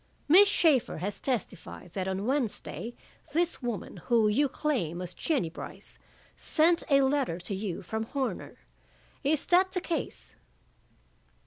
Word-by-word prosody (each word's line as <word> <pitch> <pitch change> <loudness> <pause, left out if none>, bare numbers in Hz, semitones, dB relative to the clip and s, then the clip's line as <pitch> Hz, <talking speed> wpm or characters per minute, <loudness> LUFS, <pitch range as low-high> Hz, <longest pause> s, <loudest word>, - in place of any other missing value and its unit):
"Miss 380 +7 +8
Shaeffer 310 - +3
has 190 +5 -3
testified 230 -7 -4
that 190 -1 -2
on 190 +1 -2
Wednesday 240 -2 -2 0.4
this 340 0 +1
woman, 235 -5 -4
who 230 -3 +4
you 275 +7 +3
claim 250 - -1
was 180 0 -5
Jennie 285 - 0
Brice, - - -8 0.4
sent 335 +2 +3
a 275 -1 +6
letter 265 - +1
to 190 - -4
you 190 -2 -4
from 220 +5 -3
Horner. 270 +2 -3 0.7
Is 290 +1 +1
that 375 +2 +4
the 365 - -1
case?" 340 -2 -3
255 Hz, 135 wpm, -29 LUFS, 200-305 Hz, 0.7 s, Miss